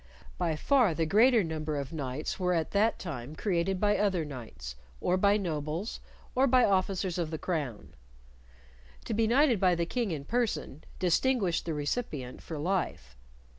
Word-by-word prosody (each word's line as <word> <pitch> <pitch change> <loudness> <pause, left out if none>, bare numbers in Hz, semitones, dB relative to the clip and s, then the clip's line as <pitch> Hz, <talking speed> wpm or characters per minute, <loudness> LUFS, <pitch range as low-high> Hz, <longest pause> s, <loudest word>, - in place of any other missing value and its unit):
By 170 -3 +1
far 235 - +3
the 165 - +1
greater 225 +6 +5
number 155 -2 -3
of 140 +2 -4
knights 140 +1 -3
were 180 -1 +1
at 160 -2 -1
that 215 +3 +2
time 145 -5 -6
created 185 0 0
by 205 +1 +2
other 190 -6 +1
knights, 115 - -8 0.2
or 180 - +1
by 200 +2 +4
nobles, 165 +1 -3 0.3
or 265 +2 +3
by 255 -1 +5
officers 190 -2 0
of 165 -2 -1
the 160 - -3
crown. 150 - -4 1.1
To - - -2
be 220 +1 +2
knighted 250 -1 +4
by 180 -2 +4
the 170 0 0
King 235 +4 -1
in 150 -5 -4
person 225 - -2
distinguished 185 +1 +1
the 160 - -1
recipient 145 - -3
for 160 - -6
life. 150 - -2
175 Hz, 165 wpm, -30 LUFS, 155-210 Hz, 1.1 s, greater